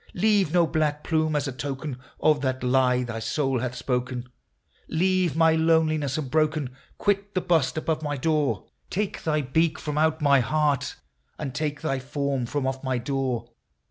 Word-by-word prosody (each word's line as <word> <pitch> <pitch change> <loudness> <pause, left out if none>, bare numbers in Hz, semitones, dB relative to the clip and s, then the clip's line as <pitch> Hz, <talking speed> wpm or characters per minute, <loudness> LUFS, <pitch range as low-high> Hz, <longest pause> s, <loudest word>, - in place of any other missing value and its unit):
Leave 200 -3 +3
no 175 -1 +4
black 155 -2 0
plume 155 -1 +1
as 145 -1 0
a - - -2
token 135 +1 -5 0.2
of 155 -2 +3
that 130 -2 -1
lie 125 0 +3
thy 115 -2 -4
soul 135 +3 0
hath 125 +1 -3
spoken! 125 0 -2 0.6
Leave 180 -1 +1
my 160 0 +5
loneliness 160 -3 +2
unbroken! 155 -2 0
— - - -33
quit 200 0 0
the - - +3
bust 160 -5 +1
above 155 0 -1
my 145 -2 -2
door! 150 +1 0 0.2
Take 205 +1 -2
thy 155 -1 +1
beak 155 +4 +1
from 150 0 -3
out 160 0 +2
my 140 -2 +5
heart, 145 0 +1 0.4
and 140 -4 -4
take 145 0 -2
thy 135 - -1
form 135 -1 -2
from 145 +2 -2
off 135 0 -2
my 130 -1 0
door 125 -2 -2
145 Hz, 175 wpm, -25 LUFS, 130-160 Hz, 0.6 s, my